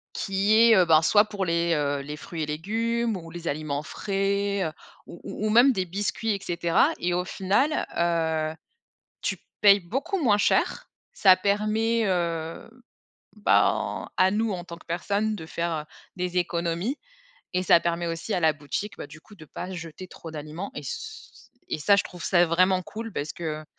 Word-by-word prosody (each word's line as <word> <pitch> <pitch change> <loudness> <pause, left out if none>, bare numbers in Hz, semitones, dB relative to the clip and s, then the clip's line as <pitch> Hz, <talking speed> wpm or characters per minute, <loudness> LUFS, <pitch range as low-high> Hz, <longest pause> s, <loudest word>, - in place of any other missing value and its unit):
Qui 195 +2 +1
est, 230 -1 +7
heu, 185 - +6
ben, 160 -1 +5
soit 205 +6 +5
pour 205 -3 -3
les, 170 0 +1
heu, 145 -2 0
les 150 +2 -7
fruits 165 -1 -5
et - - 0
légumes 225 +8 -1
ou 165 -2 -8
les 170 0 -7
aliments 145 -1 -2
frais 200 +2 -1 0.4
ou 170 - -12
ou 215 - -3
ou - - 0
même 240 +5 +6
des 190 -7 -1
biscuits 205 +4 -2
et - - -5
cetera 170 -1 +2
et 175 0 0
au 180 +1 0
final, 200 +12 0
heu, 160 -2 0 0.7
tu - - -2 0.2
payes 205 -1 +7
beaucoup 270 - -3
moins 210 -6 +4
cher. - - +1 0.2
Ça 190 -2 +6
permet, 215 +4 +1
heu, 170 +1 -2 0.7
ben, - - +1
à 185 0 +4
nous, 220 +2 0
en 175 -3 -5
tant 170 -2 -8
que 170 - -18
personne 200 +5 -1
de 160 - -8
faire, 170 +1 -3
heu, 155 -2 -2 0.3
des 180 0 -2
économies 175 - -1 0.6
et 180 0 +1
ça 170 -1 +5
permet 170 0 -1
aussi 165 +6 -4
à - - +1
la 160 -2 +3
boutique, 155 +8 -5
bah - - -7
du 155 - -13
coup, 210 +6 -17
de 175 - -13
pas 170 +4 -7
jeter 165 +1 -8
trop 165 -2 -10
d'aliments 155 +5 -6
et - - -7
c - - -4 0.8
et 155 - -2
ça, 200 +7 +5
je - - +2
trouve 175 -1 -10
ça 175 -2 +4
vraiment 185 +3 +3
cool 225 +5 -7
parce 150 -1 -3
que, 155 -3 -4
heu, - - -15
180 Hz, 190 wpm, -26 LUFS, 165-205 Hz, 0.8 s, est